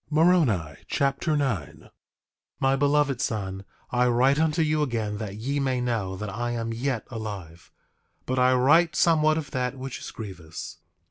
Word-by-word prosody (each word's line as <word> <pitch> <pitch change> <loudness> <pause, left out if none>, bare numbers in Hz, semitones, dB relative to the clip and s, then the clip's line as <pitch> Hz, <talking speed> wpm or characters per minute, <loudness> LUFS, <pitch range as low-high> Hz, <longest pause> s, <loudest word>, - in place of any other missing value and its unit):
Moroni 150 - +3
Chapter 140 +3 0
9 110 - -2
9:1 - - -18 0.7
My 135 0 +3
beloved 145 -2 +2
son, 95 -3 -3 0.3
I 125 0 +3
write 130 +4 +3
unto 160 +1 +2
you 155 0 +1
again 110 -7 -2
that 105 -3 -5
ye 135 +7 -2
may 130 -2 0
know 115 -6 -1
that 105 +1 -5
I 120 +3 -2
am 115 -1 -3
yet 125 -1 -2
alive; 100 -7 -7 0.5
but 130 0 -1
I 125 0 +5
write 150 +6 +4
somewhat 155 -1 +4
of 155 -3 -4
that 125 +1 -2
which 130 0 -6
is - - -7
grievous. 90 -7 -8
125 Hz, 160 wpm, -26 LUFS, 105-145 Hz, 0.7 s, I